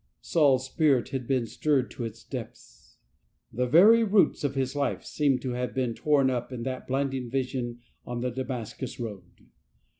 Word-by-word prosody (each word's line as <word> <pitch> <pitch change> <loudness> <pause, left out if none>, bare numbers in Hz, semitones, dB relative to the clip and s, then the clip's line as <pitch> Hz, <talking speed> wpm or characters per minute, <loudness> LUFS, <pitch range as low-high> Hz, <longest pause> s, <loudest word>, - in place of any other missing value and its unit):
Saul's 140 -5 +3
spirit 135 -3 +2
had 130 -3 -4
been 130 -3 +1
stirred 135 +2 0
to 120 - -6
its 115 0 -8
depths. - - -10 0.6
The 125 +2 0
very 210 - +7
roots 205 -6 +3
of 140 -1 -1
his 135 0 -1
life 145 -1 -1
seemed 140 -4 +1
to 130 - -2
have 125 +1 -3
been 125 -3 0
torn 145 +1 +2
up 125 0 -3
in 120 -2 -5
that 130 0 -4
blinding 135 -2 -1
vision 125 -2 -3 0.2
on 120 -1 -5
the 125 0 -1
Damas 125 -3 -4
cus 130 - -7
road. 100 -7 -8
130 Hz, 175 wpm, -27 LUFS, 120-140 Hz, 0.6 s, very